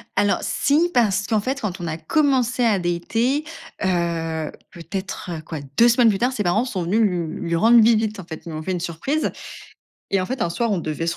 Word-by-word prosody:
Alors 205 0 +2
si, 320 +5 +2
parce 205 -5 +2
qu'en 220 -3 +2
fait, 265 +4 -3
quand 190 -3 -3
on 170 - -4
a 160 0 -3
commencé 255 - +1
à 210 -5 +3
dater, 225 - 0 0.4
heu, 165 -3 -1 0.2
peut-être, 185 +3 -6
heu, 160 -2 -5
quoi, 155 -1 -6 0.2
2 235 - +7
semaines 235 -1 +5
plus 195 - +1
tard, 245 +4 +1
ses 210 -5 -2
parents 205 +8 +2
sont 190 -8 -3
venus 205 +7 +1
lui 175 -6 -1
lui 170 - +1
rendre 230 +6 +6
visite, 220 -2 +2
en - - -6
fait, 160 -2 -8
ils - - -7
lui 155 - -5
ont 155 - -6
fait 185 - -3
une 180 - -1
surprise 175 - -2 0.8
et 195 -1 +2
en 185 - -2
fait, 260 -2 -4
un 170 - 0
soir, 230 +5 -1
on 195 - +1
devait 165 +1 -3
se 170 - -1
195 Hz, 230 wpm, -22 LUFS, 170-235 Hz, 0.8 s, 2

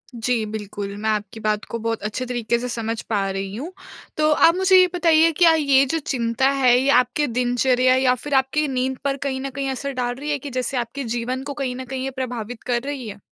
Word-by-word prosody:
जी, 230 -1 0
बिल्कुल 205 -1 -6
मैं 215 +1 -2
आपकी 210 0 -2
बात 215 -1 -1
को 230 - -3
बहुत 225 0 -2
अच्छे 215 +4 -3
तरीके 240 -2 -1
से 250 - -4
समझ 230 -1 -3
पा 200 -3 0
रही 195 +1 -4
हूँ। 300 +10 -6 0.5
तो 305 0 +3
आप 330 +3 +5
मुझे 375 0 +5
ये 365 - +6
बताइए 330 -2 +4
क्या 335 -2 +6
ये 280 -3 +4
जो 325 +5 -1
चिंता 250 -1 0
है 245 -1 +6
ये 270 - +1
आपके 250 +4 -2
दिनचर्या 250 +1 +2
या 260 -1 +3
फिर 290 - -4
आपकी 270 +3 +1
नींद 260 0 -1
पर 280 0 0
कहीं 265 -1 -3
न 275 - -4
कहीं 275 +1 -3
असर 280 +2 -4
डाल 245 -1 -2
रही 295 +3 -4
है 290 - -1
कि 285 +2 -7
जैसे 255 +1 -2
आपके 245 +4 -3
जीवन 255 +3 -3
को 285 - -5
कहीं 270 -3 -3
न 260 0 -6
कहीं 260 +1 -5
ये 270 - -2
प्रभावित 245 -3 -5
कर 240 -1 0
रही 275 -4 -5
है? 205 -1 -8
255 Hz, 235 wpm, -22 LUFS, 230-275 Hz, 0.5 s, ये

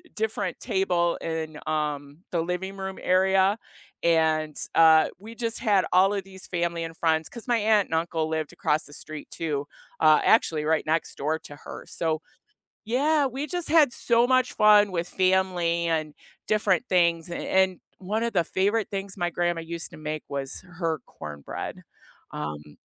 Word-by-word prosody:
different 220 0 -2
table 175 -3 +1
in, 160 -2 -4
um, 150 -1 -2
the 170 - 0
living 180 +3 -4
room 190 0 -5
area, 190 +2 +3 0.5
and, 160 -2 +2 0.2
uh, 160 -1 +7
we 220 +3 -10
just 230 -1 -3
had 205 -6 +3
all 190 +2 +5
of 200 -2 -2
these 190 -1 -10
family 170 -1 -1
and 165 0 -6
friends, 160 -1 +1
'cause 235 0 -10
my 240 -1 +3
aunt 210 -2 +3
and 160 - -2
uncle 160 -1 -1
lived 160 -1 -3
across 150 +1 0
the 145 - -11
street 155 -1 -8
too, 145 -3 -3 0.3
uh, 155 -1 +6
actually 160 -8 +3
right 160 0 +1
next 160 +1 -1
door 155 +3 -1
to 145 - -11
her, - - -10
so 160 -1 -1 0.6
Yeah, 285 +5 +2
we 265 +3 -3
just 350 0 -3
had 300 -5 +5
so 235 -1 +2
much 255 -1 +2
fun 210 -1 +6
with 170 0 -2
family 185 -3 +1
and 155 -2 -1 0.3
different 215 +1 +2
things, 170 -2 +2
a 170 - -4
and 190 -1 +1 0.2
one 210 +4 -2
of 235 - -1
the 175 - +3
favorite 200 +5 0
things 195 0 -4
my 175 -2 -1
grandma 175 0 0
used 170 0 -5
to - - -10
make 155 0 -4
was 140 -1 -4 0.2
her 165 -4 -1
cornbread, 75 -2 -7 0.5
um 75 0 -6
175 Hz, 170 wpm, -26 LUFS, 160-200 Hz, 0.6 s, uh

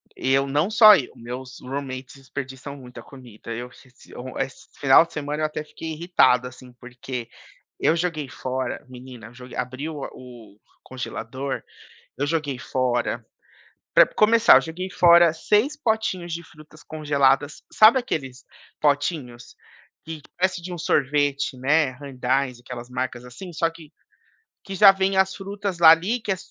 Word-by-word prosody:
Eu 135 +1 +1
não 145 +7 0
só 215 -1 +9
eu, 140 -9 -3
meus 125 +2 -8
roommates 130 0 -6
desperdiçam 135 0 -8
muita 125 -3 -11
comida, 120 -5 -12
eu 120 +2 -7
se 130 - -19
esse 130 +2 -8
final 135 +4 +6
de 170 - -19
semana 150 +1 -3
eu - - +3
até 155 0 -4
fiquei 160 +1 -8
irritado, 150 -7 +2
assim, 125 0 -14
porque, 125 0 -8 0.5
eu 160 - +3
joguei 165 -4 -2
fora, 130 -1 -4
menina, 125 -2 -11
eu 115 - -16
jo 125 +1 -12
abri 130 +4 -4
a - - -4
o 145 -3 -7
o 120 -5 -14 0.3
congelador, 130 +1 -5 0.6
eu 145 +2 -1
joguei 145 -4 -2
fora 120 -3 -1 0.7
pra - - +8
começar, 230 +2 +5
eu - - +2
joguei 180 +3 -6
fora 170 -2 +6
6 210 - +1
potinhos 220 - -2
de 170 +1 -5
frutas 155 -1 -17
congeladas, 145 -2 +1
sabe, 225 +4 +6
aqueles 135 - -5 0.4
potinhos, 145 -5 -1 0.5
que 160 -1 -7 0.2
parece 185 -1 0
de 180 0 -6
um - - -6
sorvete, 145 -2 0
né, 145 +3 +2
Haagen-Dazs 130 -1 -2
aquelas, 125 -1 -9
marcas 125 -1 -4
assim 170 +9 -10
só 165 +1 0
que, 165 -2 -15 0.7
que 195 - -7
já 195 0 +8
vem 195 0 0
as 190 0 +2
frutas 200 -2 -5
lá 165 -2 +9
ali 190 +9 0
que 215 - -5
é 190 - -2
140 Hz, 155 wpm, -23 LUFS, 130-170 Hz, 0.7 s, só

